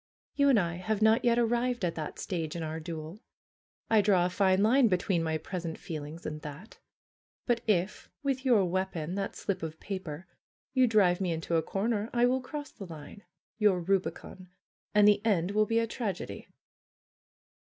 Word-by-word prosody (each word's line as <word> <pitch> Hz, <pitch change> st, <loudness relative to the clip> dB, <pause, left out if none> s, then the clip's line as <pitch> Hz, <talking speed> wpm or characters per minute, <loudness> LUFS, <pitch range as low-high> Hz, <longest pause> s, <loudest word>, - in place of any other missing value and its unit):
"You 280 Hz, -1 st, +3 dB
and 250 Hz, -6 st, +5 dB
I 170 Hz, -2 st, -1 dB
have 215 Hz, +3 st, -1 dB
not 220 Hz, +3 st, +4 dB
yet 235 Hz, -1 st, +3 dB
arrived 240 Hz, -1 st, +1 dB
at 170 Hz, -, -1 dB
that 155 Hz, -2 st, -6 dB
stage 165 Hz, -4 st, -3 dB
in 170 Hz, -, -3 dB
our 160 Hz, +1 st, -4 dB
duel. 160 Hz, +3 st, -7 dB, 0.7 s
I 220 Hz, -2 st, +5 dB
draw 190 Hz, -3 st, +3 dB
a 180 Hz, -, -1 dB
fine 190 Hz, 0 st, +3 dB
line 245 Hz, +3 st, +5 dB
between 180 Hz, -2 st, +1 dB
my 160 Hz, -1 st, 0 dB
pres 180 Hz, +2 st, -6 dB
ent 165 Hz, -1 st, -4 dB
feelings 160 Hz, -2 st, -7 dB
and 150 Hz, 0 st, -5 dB
that. 150 Hz, +9 st, -10 dB, 0.7 s
But 240 Hz, -2 st, +1 dB
if, 195 Hz, -1 st, 0 dB
with 270 Hz, -2 st, -1 dB
your 235 Hz, -8 st, +4 dB
weapon, 180 Hz, -2 st, -2 dB
that 195 Hz, 0 st, -3 dB
slip 190 Hz, -3 st, -3 dB
of 160 Hz, 0 st, -6 dB
paper, 185 Hz, -4 st, -6 dB, 0.5 s
you 260 Hz, -2 st, +4 dB
drive 195 Hz, -5 st, +3 dB
me 180 Hz, -2 st, 0 dB
into 165 Hz, +1 st, -2 dB
a 165 Hz, -, +3 dB
corner, 210 Hz, +4 st, -1 dB
I 240 Hz, 0 st, +4 dB
will 255 Hz, +1 st, +2 dB
cross 290 Hz, +3 st, -7 dB
the 195 Hz, -, -9 dB
line, 160 Hz, +4 st, -10 dB, 0.4 s
your 205 Hz, -4 st, +4 dB
rubicon, 185 Hz, 0 st, -2 dB, 0.5 s
and 210 Hz, 0 st, +7 dB
the 205 Hz, 0 st, +4 dB
end 195 Hz, -5 st, +1 dB
will 215 Hz, +1 st, +2 dB
be 230 Hz, -, +1 dB
a 230 Hz, -, +3 dB
tragedy." 220 Hz, -5 st, -5 dB
195 Hz, 185 wpm, -30 LUFS, 170-225 Hz, 0.7 s, and